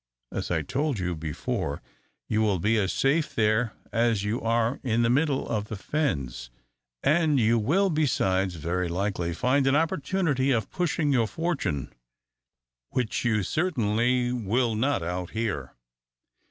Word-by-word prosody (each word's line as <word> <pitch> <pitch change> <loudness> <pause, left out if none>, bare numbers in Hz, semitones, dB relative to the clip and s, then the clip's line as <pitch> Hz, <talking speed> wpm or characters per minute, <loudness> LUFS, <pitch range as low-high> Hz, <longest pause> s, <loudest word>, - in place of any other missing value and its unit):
As - - -3
I - - 0
told 145 -2 -1
you 90 -2 -1
before, 75 -2 -3 0.5
you 110 0 +1
will 105 -3 +2
be 105 +6 +1
as 95 -2 0
safe 145 +4 +1
there 110 +1 +2 0.2
as 115 -3 +2
you 105 +4 -1
are 115 +2 +1
in 120 -2 +1
the 115 - +3
middle 140 +1 +1
of 105 -2 -1
the 105 - -6
fens, 70 - -2 0.5
and 155 -2 +3
you 115 0 +3
will, 185 - +2
besides, 95 - +1
very 85 +3 -2
likely 90 -1 -1
find 130 +10 +1
an 135 - +4
opportunity 150 -3 +1
of 115 -7 0
pushing 165 -4 0
your 115 -4 +3
fortune, 145 - -2 1.0
which 125 -3 -1
you 110 -4 +2
certainly 125 - +1
will 120 +1 0
not 115 -3 0
out 90 +1 -3
here." 75 - -2
115 Hz, 145 wpm, -27 LUFS, 95-140 Hz, 1.0 s, an